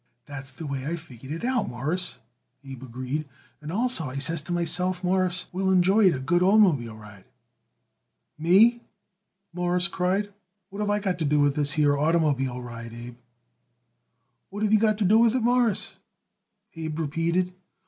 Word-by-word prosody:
"That's 140 Hz, -2 st, -8 dB
the 140 Hz, +4 st, -9 dB
way 140 Hz, -1 st, -4 dB
I 165 Hz, -, -1 dB
figured 135 Hz, -5 st, -12 dB
it 165 Hz, +8 st, -4 dB
out, 250 Hz, -, 0 dB
Mawruss," 150 Hz, +10 st, -3 dB, 0.5 s
Abe 135 Hz, -2 st, -10 dB
agreed; 130 Hz, +4 st, -5 dB, 0.3 s
"and 150 Hz, +1 st, -7 dB
also, 230 Hz, -3 st, +1 dB
I 130 Hz, -, -8 dB
says 165 Hz, +3 st, 0 dB
to -, -, -6 dB
myself, 180 Hz, +2 st, 0 dB
Mawruss 185 Hz, 0 st, 0 dB
will 190 Hz, +1 st, 0 dB
enjoy 190 Hz, +3 st, +4 dB
it 175 Hz, -, +3 dB
a -, -, -4 dB
good 175 Hz, +7 st, +1 dB
oitermobile 175 Hz, -, +3 dB
ride." 100 Hz, -3 st, -14 dB, 1.1 s
"Me!" 205 Hz, +9 st, +4 dB, 0.7 s
Morris 175 Hz, 0 st, +1 dB
cried. 190 Hz, +4 st, -1 dB, 0.4 s
"What 200 Hz, -, -8 dB
have 210 Hz, -1 st, -1 dB
I 205 Hz, -, +2 dB
got 190 Hz, -4 st, -2 dB
to 160 Hz, -, -1 dB
do 150 Hz, +1 st, +2 dB
with 145 Hz, -1 st, +3 dB
this 145 Hz, 0 st, +2 dB
here 150 Hz, -2 st, +3 dB
oitermobile 140 Hz, -5 st, 0 dB
ride, 115 Hz, -1 st, -9 dB
Abe?" 120 Hz, 0 st, -9 dB, 1.3 s
"What 205 Hz, +2 st, -5 dB
have 215 Hz, 0 st, +2 dB
you 215 Hz, -, +6 dB
got 215 Hz, -1 st, +2 dB
to 210 Hz, -, 0 dB
do 215 Hz, +4 st, +5 dB
with 235 Hz, +1 st, +4 dB
it, 255 Hz, -, 0 dB
Mawruss?" 240 Hz, -3 st, +1 dB, 0.8 s
Abe 160 Hz, -1 st, -5 dB
repeated. 165 Hz, +4 st, -1 dB
170 Hz, 170 wpm, -25 LUFS, 140-190 Hz, 1.3 s, you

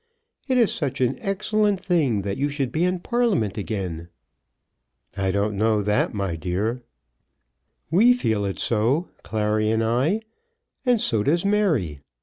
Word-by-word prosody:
It 260 Hz, -2 st, +2 dB
is 235 Hz, -4 st, +3 dB
such 140 Hz, -6 st, -3 dB
an 130 Hz, 0 st, 0 dB
excellent 205 Hz, 0 st, 0 dB
thing 155 Hz, -, +1 dB
that 100 Hz, 0 st, -2 dB
you 145 Hz, +2 st, -1 dB
should 140 Hz, -3 st, -2 dB
be 160 Hz, -, 0 dB
in 180 Hz, 0 st, 0 dB
Parliament 215 Hz, -, 0 dB
again." 95 Hz, -6 st, -4 dB, 1.1 s
"I 95 Hz, -1 st, -1 dB
don't 100 Hz, +2 st, 0 dB
know 110 Hz, 0 st, +2 dB
that, 105 Hz, +1 st, +1 dB
my 100 Hz, -5 st, -2 dB
dear." 100 Hz, +9 st, -2 dB, 1.1 s
"We 225 Hz, +9 st, +6 dB
feel 110 Hz, -, 0 dB
it 100 Hz, -1 st, -3 dB
so, 120 Hz, +10 st, +1 dB
Clary 110 Hz, 0 st, 0 dB
and 110 Hz, +1 st, +1 dB
I, 130 Hz, -, +1 dB, 0.7 s
and 245 Hz, -2 st, +4 dB
so 110 Hz, -, +1 dB
does 170 Hz, -, +1 dB
Mary. 160 Hz, -, +1 dB
120 Hz, 145 wpm, -23 LUFS, -, 1.1 s, We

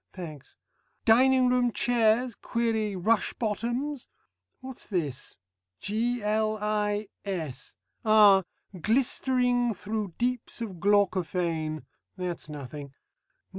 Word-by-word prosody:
(Thanks.) 155 Hz, -7 st, -9 dB, 0.5 s
Dining 255 Hz, +2 st, +5 dB
room 250 Hz, -1 st, +2 dB
chairs 235 Hz, +1 st, +2 dB
query 220 Hz, -3 st, -1 dB
rush 210 Hz, +3 st, +1 dB
bottoms? 240 Hz, +5 st, -3 dB, 0.5 s
What's 260 Hz, -1 st, -9 dB
this? 155 Hz, -, -3 dB, 0.4 s
G.L.I.S. 210 Hz, -, -2 dB, 0.3 s
ah! 210 Hz, -3 st, +7 dB, 0.4 s
"Glistering 245 Hz, 0 st, +2 dB
thro' 210 Hz, +2 st, -3 dB
deeps 245 Hz, 0 st, -2 dB
of 205 Hz, -7 st, -6 dB
glaucophane" 175 Hz, -5 st, +1 dB, 0.3 s
that's 180 Hz, -3 st, -5 dB
nothing. 140 Hz, -1 st, -8 dB
215 Hz, 80 wpm, -28 LUFS, 185-240 Hz, 0.5 s, ah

